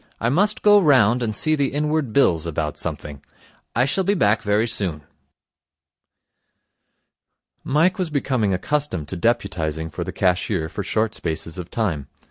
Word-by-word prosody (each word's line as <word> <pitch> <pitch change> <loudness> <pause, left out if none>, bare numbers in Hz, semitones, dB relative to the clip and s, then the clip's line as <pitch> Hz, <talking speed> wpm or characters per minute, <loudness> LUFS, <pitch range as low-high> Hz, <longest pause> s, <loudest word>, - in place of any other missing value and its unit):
I 115 - 0
must 205 +10 +1
go 205 -1 +6
round 125 - +4
and 110 -3 -1
see 155 - +2
the 140 -3 +1
Inward 150 -3 -1
Bills 85 - +2
about 75 -2 -3
something. 70 -2 -5 0.5
I 120 +2 +3
shall 190 +8 +1
be 200 +3 +1
back 105 - +2
very 105 +2 +1
soon.' 85 -9 -2 2.6
Mike 165 +7 +2
was 180 -3 -1
becoming 130 -8 0
accustomed 95 - -2
to - - -4
deputizing 80 -7 -1
for - - -3
the - - -5
cashier 90 -3 0
for 100 - -5
short 110 +2 -1
spaces 80 -1 -4
of 90 - -7
time. 90 - -2
110 Hz, 150 wpm, -22 LUFS, -, 2.6 s, go